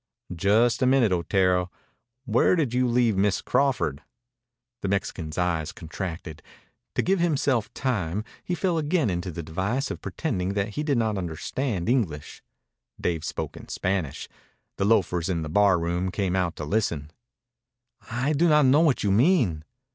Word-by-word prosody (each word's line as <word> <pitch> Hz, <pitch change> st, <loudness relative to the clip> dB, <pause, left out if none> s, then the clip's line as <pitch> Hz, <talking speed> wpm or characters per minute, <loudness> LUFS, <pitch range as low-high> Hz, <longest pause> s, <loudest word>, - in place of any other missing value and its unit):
"Just 110 Hz, +9 st, +3 dB
a 130 Hz, -, +4 dB
minute, 130 Hz, -5 st, +4 dB
Otero. 90 Hz, +1 st, +1 dB, 0.6 s
Where 120 Hz, +9 st, +3 dB
did 145 Hz, -9 st, 0 dB
you 125 Hz, 0 st, +2 dB
leave 120 Hz, -3 st, +2 dB
Miss 100 Hz, 0 st, +2 dB
Crawford?" 125 Hz, -, 0 dB, 0.8 s
The -, -, -2 dB
Mexican's 95 Hz, -5 st, -2 dB
eyes 85 Hz, -3 st, 0 dB
contracted. 80 Hz, -1 st, -6 dB, 0.5 s
To -, -, +1 dB
give 190 Hz, +1 st, +2 dB
himself 140 Hz, -9 st, +1 dB
time 105 Hz, -7 st, -1 dB, 0.2 s
he 180 Hz, -, -2 dB
fell 175 Hz, -2 st, 0 dB
again 150 Hz, -, +1 dB
into 90 Hz, +1 st, -3 dB
the 85 Hz, 0 st, -6 dB
device 95 Hz, -, -2 dB
of -, -, -6 dB
pretending 100 Hz, -, -2 dB
that 100 Hz, +1 st, 0 dB
he 105 Hz, -, -4 dB
did 145 Hz, -4 st, +1 dB
not 110 Hz, -3 st, 0 dB
understand 90 Hz, -, -3 dB
English. 100 Hz, -, -1 dB, 0.6 s
Dave 80 Hz, -3 st, -1 dB
spoke -, -, -4 dB
in -, -, -11 dB
Spanish. 90 Hz, -7 st, -2 dB, 0.5 s
The 100 Hz, -, 0 dB
loafers 90 Hz, -5 st, +2 dB
in 85 Hz, -3 st, -1 dB
the 75 Hz, -, -5 dB
bar 100 Hz, +2 st, +4 dB
room 85 Hz, +2 st, -1 dB
came 95 Hz, -1 st, -1 dB
out 90 Hz, -2 st, 0 dB
to 75 Hz, -, -5 dB
listen. 75 Hz, -5 st, -1 dB, 1.0 s
"I 125 Hz, +6 st, 0 dB
do 165 Hz, +4 st, +3 dB
not 150 Hz, -2 st, +5 dB
know 135 Hz, +4 st, +5 dB
what 155 Hz, -6 st, +2 dB
you 100 Hz, -, +2 dB
mean." 115 Hz, -, +3 dB
100 Hz, 160 wpm, -25 LUFS, 85-130 Hz, 1.0 s, not